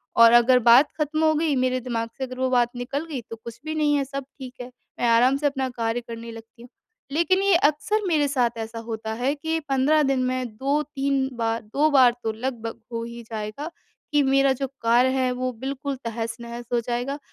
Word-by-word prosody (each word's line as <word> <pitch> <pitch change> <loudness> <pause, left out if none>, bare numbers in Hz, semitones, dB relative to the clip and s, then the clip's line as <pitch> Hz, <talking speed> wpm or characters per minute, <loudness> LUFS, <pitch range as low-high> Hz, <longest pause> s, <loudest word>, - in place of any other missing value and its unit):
और 230 0 +8
अगर 240 +2 +6
बात 240 +5 +7
ख़त्म 300 +1 -1
हो 315 0 +4
गई, 305 -2 +1
मेरे 255 0 +1
दिमाग़ 235 -2 -3
से 270 - -4
अगर 255 -1 -6
वो 260 0 +1
बात 245 -2 +3
निकल 275 +5 -4
गई, 295 -6 -5
तो 230 - -6
कुछ 225 0 -11
भी 310 0 -3
नहीं 300 -1 +2
है, 280 - +1
सब 275 +1 -5 0.2
ठीक 255 -2 -8
है, 245 +1 -8 0.3
मैं 240 - +1
आराम 245 +4 +4
से 290 +1 +1
अपना 270 -2 -2
कार्य 235 -1 -2
करने 230 0 -8
लगती 225 +1 -13
हूँ। 245 - -13 0.4
लेकिन 340 +6 +2
ये 395 -2 +4
अक्सर 335 +7 +2
मेरे 305 -4 +2
साथ 245 -4 0
ऐसा 225 0 -5
होता 220 -1 -5
है 250 +5 0
कि 320 +2 -2
15 275 +3 +3
दिन 270 -2 +1
में 255 0 -1
2-3 275 0 0
बार 230 0 -1
2 280 +8 +1
बार 260 -3 +6
तो 220 - 0
लगभग 230 0 -5
हो 230 -1 -3
ही 235 0 -8
जाएगा, 220 +6 -6 0.4
कि 295 -1 +3
मेरा 270 0 +3
जो 270 +1 -3
कार्य 240 +3 +4
है 255 -1 +1
वो 255 0 -2
बिल्कुल 275 +2 -4
तहस-नहस 235 +1 -5
हो 240 - +3
जाएगा, 245 +4 -2
255 Hz, 210 wpm, -24 LUFS, 235-280 Hz, 0.4 s, और